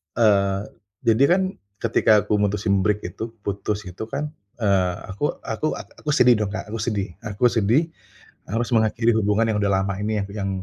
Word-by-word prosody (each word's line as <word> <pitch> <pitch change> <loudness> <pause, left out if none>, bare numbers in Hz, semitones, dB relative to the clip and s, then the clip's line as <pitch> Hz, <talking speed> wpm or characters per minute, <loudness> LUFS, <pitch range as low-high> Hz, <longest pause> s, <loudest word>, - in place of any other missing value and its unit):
Eee, 100 -3 +3 0.4
jadi 115 +3 +5
kan 190 +2 +4 0.4
ketika 110 -2 +4
aku 105 - 0
mutusin 100 -1 +1
break 105 +1 +1
itu, 90 +5 -6 0.2
putus 100 +1 -2
itu 90 +1 -7
kan, 145 +5 -4 0.3
eee, 95 -3 +2 0.2
aku 100 +8 -7 0.2
aku 115 +7 -3
ak - - -9
aku 150 - -5
sedih 125 0 +6
dong, 105 - 0
Kak, 105 - -6
aku 115 - -4
sedih 105 -3 -1
aku 110 0 -2
sedih. 120 +10 +2 0.6
Harus 115 +2 -1
mengakhiri 115 +1 +3
hubungan 105 +1 +2
yang 105 - 0
udah 100 -1 +2
lama 100 0 -1
ini, 105 0 0
yang - - -7
yang 100 -1 -3
105 Hz, 180 wpm, -23 LUFS, 100-115 Hz, 0.6 s, sedih